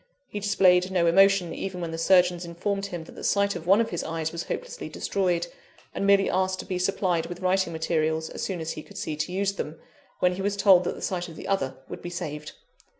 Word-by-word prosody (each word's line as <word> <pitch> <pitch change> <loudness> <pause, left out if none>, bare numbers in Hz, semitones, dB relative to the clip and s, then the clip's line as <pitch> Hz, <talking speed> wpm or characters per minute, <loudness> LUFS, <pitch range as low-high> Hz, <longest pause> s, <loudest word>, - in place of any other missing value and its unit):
He 205 - -4
displayed 185 -3 +4
no 180 -2 +2
emotion 195 +1 +4
even 190 -2 -5
when 170 -2 -4
the 165 - -4
surgeons 180 0 +4
informed 195 +4 -3
him 175 -4 -6
that - - -13
the - - -10
sight 200 -1 +2
of 170 -1 -7
one 195 +3 +6
of 230 - 0
his 175 - -2
eyes 160 -1 -3
was 170 0 -5
hopelessly - - -5
destroyed; 180 -3 0 0.5
and 200 - -1
merely 200 0 +5
asked 185 0 +1
to - - -12
be 185 -2 -3
supplied 180 -2 0
with 175 +1 -8
writing 185 -1 +1
materials 160 -1 0
as - - -6
soon 190 -3 -2
as 160 - -3
he - - -6
could - - -14
see 155 - -3
to 150 +4 -3
use 195 +1 0
them, 160 -5 -5 0.4
when 180 0 +2
he - - -3
was 200 +1 -1
told 190 -3 +6
that - - -2
the - - -9
sight 180 -1 -2
of 165 - -11
the - - -8
other 135 -10 0
would - - -8
be 175 - -6
saved. 150 -3 -5
180 Hz, 240 wpm, -26 LUFS, 170-195 Hz, 0.5 s, one